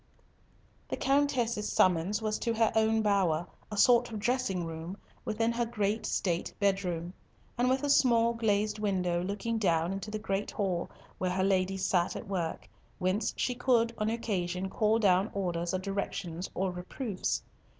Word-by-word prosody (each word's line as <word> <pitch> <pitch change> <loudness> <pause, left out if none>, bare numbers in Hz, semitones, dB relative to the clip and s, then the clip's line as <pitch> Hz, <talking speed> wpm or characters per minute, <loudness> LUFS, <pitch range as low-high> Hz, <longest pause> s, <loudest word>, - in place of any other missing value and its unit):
The - - -2
Countess's 265 -6 +1
summons 185 +4 +2
was 215 0 -1
to 230 -1 -1
her 225 0 +3
own 220 0 +3
bower, 185 -6 +2 0.3
a 210 - -4
sort 245 +3 +5
of 220 - -4
dressing 210 -5 0
room, 165 +3 -6 0.3
within 225 +2 +1
her 235 0 0
great 215 -1 -1
state 175 -3 -1
bed 200 -1 +2
room, 175 0 -3 0.4
and 245 +1 +2
with 265 +2 +1
a 290 - 0
small 235 -4 +4
glazed 215 -2 0
window 180 -4 0
looking 215 +4 -2
down 170 -3 +1
into 195 +2 -5
the 215 - -3
great 200 -1 -2
hall 185 -4 -2 0.3
where 185 - 0
her 185 +1 0
ladies 190 0 +1
sat 175 -2 +1
at - - -6
work, 180 -4 -3 0.3
whence 190 +4 0
she 250 - 0
could 240 -2 +2
on 215 0 +1
occasion 190 -5 -2
call 215 +1 +2
down 195 -2 +3
orders 175 -3 -1
or 185 - 0
directions 185 -2 -4
or 190 0 0
reproofs. 185 +4 -3
200 Hz, 165 wpm, -30 LUFS, 185-225 Hz, 0.4 s, sort